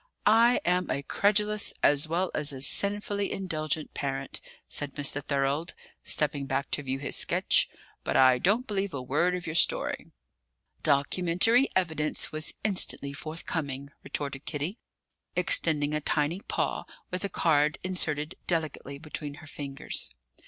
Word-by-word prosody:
"I 230 +3 +5
am 180 0 +1
a 140 - -1
credulous 210 +5 +1
as 145 +1 +4
well 175 +3 0
as 150 -1 +2
a 135 -1 -2
sinfully 200 +4 0
indulgent 155 -5 -3
parent," 135 -1 -3 0.3
said 145 -2 +1
Mr. 145 0 -1
Thorold, 140 +3 -1 0.3
stepping 145 -2 0
back 135 0 -2
to - - +2
view 135 -1 -2
his 140 +1 -3
sketch; - - +3 0.3
"but - - 0
I 130 -1 +6
don't 215 - +2
believe 200 - -2
a 135 - -3
word 160 +8 +1
of 180 - -5
your 160 - -3
story." 170 - +2 0.7
"'Documentary 180 - +3
evidence 160 -4 0
was 155 0 -2
instantly 185 -8 0
forthcoming,'" 145 -2 -4
retorted 140 -1 -5
Kitty, 155 - -3 0.6
extending 150 - +3
a 150 - 0
tiny 150 +4 0
paw - - -1 0.3
with 180 +1 -2
a 200 - -1
card 150 -4 +2
inserted 155 -5 0
delicately 155 -4 -2
between 150 -1 -6
her 160 - -13
fingers. 135 - -4
155 Hz, 140 wpm, -28 LUFS, 140-180 Hz, 0.7 s, I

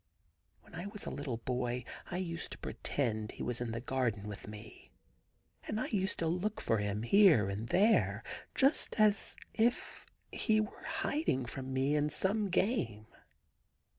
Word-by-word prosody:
When - - -20
I 175 - -5
was 205 0 -4
a - - -3
little 140 -5 -3
boy 125 +1 -2 0.3
I 175 - -3
used 170 -3 -4
to - - -9
pretend 110 -6 -2
he - - -6
was 125 0 -2
in 120 -2 -2
the 115 - -3
garden 120 -5 -1
with 100 -2 -7
me, 105 +1 -10 0.8
and 215 - -1
I - - -2
used 195 -2 0
to 165 - 0
look 180 +6 -1
for 115 - +1
him 105 +1 -1
here 170 - +6
and 105 +4 -3
there, 120 - +3 0.3
just 270 -3 +3
as 210 -1 +4 0.2
if 235 +2 0 0.2
he 215 -1 +2
were 215 - -4
hiding 305 - 0
from 130 +2 -6
me 135 +3 +1
in 150 0 +2
some 195 +6 0
game. 180 - 0
140 Hz, 165 wpm, -33 LUFS, -, 0.8 s, here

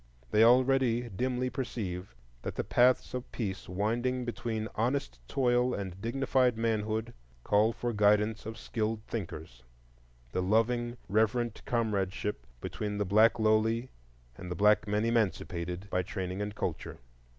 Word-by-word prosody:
They 110 - +5
already 125 -1 +4
dimly 125 +4 -1
perceive 95 - -4 0.3
that - - -5
the - - -1
paths 125 +1 +3
of 125 0 -5
peace 95 -7 -4
winding 120 +6 -1
between 115 -2 -3
honest 115 - -1
toil 125 -1 +2
and 95 -2 -6
dignified 125 0 +1
manhood 110 0 -1 0.3
call 105 +2 +3
for 120 +1 -3
the 110 - -6
guidance 105 +1 +3
of 110 - -6
skilled 110 -1 -2
thinkers, 80 - -6 0.7
the 90 - -1
loving, 120 +5 +1
reverent 110 +2 +1
comradeship 105 -4 -1
between 105 -1 -4
the 105 - 0
black 110 +5 +5
lowly 110 +2 +2 0.5
and 90 - -7
the 90 - -3
black 105 +3 +4
men 105 +2 +1
emancipated 95 -5 -1
by 90 - +2
training 95 0 -4
and 105 0 -4
culture. - - -4
110 Hz, 140 wpm, -30 LUFS, 100-120 Hz, 0.7 s, They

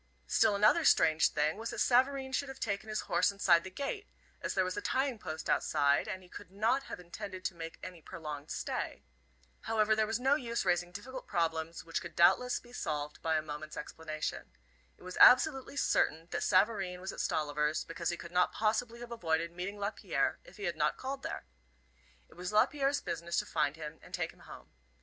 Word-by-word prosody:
Still 205 - +3
another 215 +12 +5
strange 160 - +5
thing 150 +3 0
was 225 +1 -4
that - - -5
Savareen 265 +1 +3
should 280 +1 0
have 270 - -8
taken 205 0 -2
his 215 - -1
horse - - +2
inside 195 -4 +4
the 190 - -6
gate, 400 - -4 0.3
as - - -3
there 190 - +3
was 185 0 -2
a - - -3
tying 265 -3 0
post 160 -3 -5
outside, 145 +1 +2
and 190 -3 -5
he - - -16
could 175 - -11
not 225 +8 +1
have - - -7
intended 185 +1 -8
to - - 0
make 165 -1 -7
any 180 -3 -8
prolonged 150 -2 -7
stay. - - -3 0.6
However, 215 -1 +3
there 215 0 +2
was 220 +2 -1
no 265 +2 +3
use 235 -5 -1
raising 175 0 +1
difficult 255 +7 -8
problems, 165 -2 -1
which 165 - -2
could 170 - -9
doubt 170 -1 +6
less 250 0 -2
be 240 0 -17
solved 150 -8 -3
by 160 -1 +1
a 155 - -1
moment's 155 0 -7
explanation. 155 0 -5 0.5
It - - -18
was 185 0 -7
absolutely 265 +2 +6
certain 165 - +1
that - - -2
Savareen 190 -2 +2
was 190 +1 -5
at - - -9
Stolliver's 150 0 0
because 170 0 -3
he 175 - -2
could 170 - -9
not 180 0 +3
possibly 225 +2 0
have 240 0 -8
avoided 165 -6 0
meeting 180 +4 -5
Lapierre 205 +1 -1
if - - -16
he - - -8
had - - -1
not - - +1
called 270 +1 -4
there. - - -5 0.8
It - - -19
was 180 +2 -5
Lapierre's 275 +6 +2
business 170 -1 -3
to - - +1
find 145 +1 0
him 160 0 -8
and 180 - -6
take 175 -3 -3
him - - -24
home. - - -13
185 Hz, 205 wpm, -32 LUFS, 165-235 Hz, 0.8 s, doubt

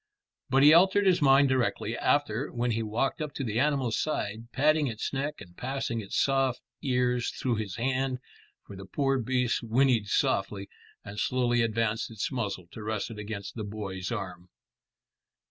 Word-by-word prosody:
But 135 +1 +4
he 150 +2 +9
altered 190 +4 +5
his 185 -4 +4
mind 140 0 +6
directly 120 -3 0
after, 135 -2 0
when 120 0 -1
he 115 0 0
walked 115 +8 -1
up 150 -2 -4
to 140 - -3
the 115 -2 -1
animal's 135 -5 +1
side, 115 -6 -3
patting 150 +2 +3
its 115 +1 -4
neck 140 +2 -2
and 90 -3 -13
passing 130 -2 -3
its 100 - -4
soft 135 -2 +2 0.2
ears 125 -3 +1
through 120 -3 -2
his 105 -4 -4
hand, 130 +1 0 0.5
for 100 - -10
the 95 0 -9
poor 135 +5 0
beast 125 0 0
whinnied 120 -1 +2
softly, 100 0 0 0.4
and 100 +1 -7
slowly 120 +1 +1
advanced 115 0 0
its 110 +2 -3
muzzle 100 -8 -3
to 110 - -9
rest 110 +1 -3
it 105 - -8
against 100 -1 -6
the 110 - -5
boy's 100 -3 -5
arm. 90 -1 -5
120 Hz, 170 wpm, -28 LUFS, 105-135 Hz, 0.5 s, he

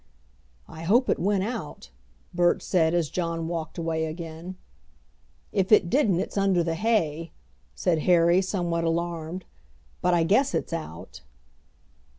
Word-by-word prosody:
"I 160 - -10
hope 225 +10 +3
it - - 0
went 195 +1 +1
out," 205 - -6 0.4
Bert 175 0 +2
said, 165 -2 +2
as 170 -3 +1
John 165 -2 -2
walked 165 -2 -4
away 165 -1 -1
again. 165 +2 -7 1.0
"If 190 0 0
it 180 -5 +5
didn't 215 - +3
it's 200 - -2
under 190 -3 +2
the 165 -1 -1
hay," 165 -5 0 0.4
said 170 -3 +1
Harry, 170 +1 +4
somewhat 175 -3 -1
alarmed. 170 +1 -2 0.6
"But 180 -1 +3
I 170 - +3
guess 235 +11 +2
it's - - -2
out." 155 - -7
170 Hz, 140 wpm, -26 LUFS, 165-190 Hz, 1.0 s, it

